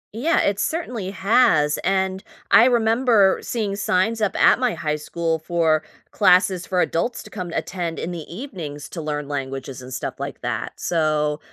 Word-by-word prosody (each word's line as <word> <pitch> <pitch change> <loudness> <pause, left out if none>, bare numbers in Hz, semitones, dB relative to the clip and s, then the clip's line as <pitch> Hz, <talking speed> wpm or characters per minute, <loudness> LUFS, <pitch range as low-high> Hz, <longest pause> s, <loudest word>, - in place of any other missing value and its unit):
Yeah, 310 +9 +2
it 200 0 0
certainly 245 - -2
has, 195 -6 +3
and 190 0 0 0.3
I 230 - +8
remember 230 -4 +3
seeing 210 -4 -2
signs 205 +3 0
up 205 -2 0
at - - +5
my 250 -3 +1
high 150 0 -2
school 165 +1 -2
for 160 -1 +1 0.3
classes 185 -2 +3
for 180 -1 +1
adults 200 +9 -1
to - - -14
come 180 -4 -5
and 165 - -7
attend 175 -3 -3
in 180 - -4
the 175 - -5
evenings 175 - -7
to 165 - -6
learn 150 -2 -3
languages 135 -2 -5
and 125 +1 -10
stuff 125 - -5
like - - -6
that, - - -3
so 155 -2 0
180 Hz, 170 wpm, -22 LUFS, 155-215 Hz, 0.3 s, I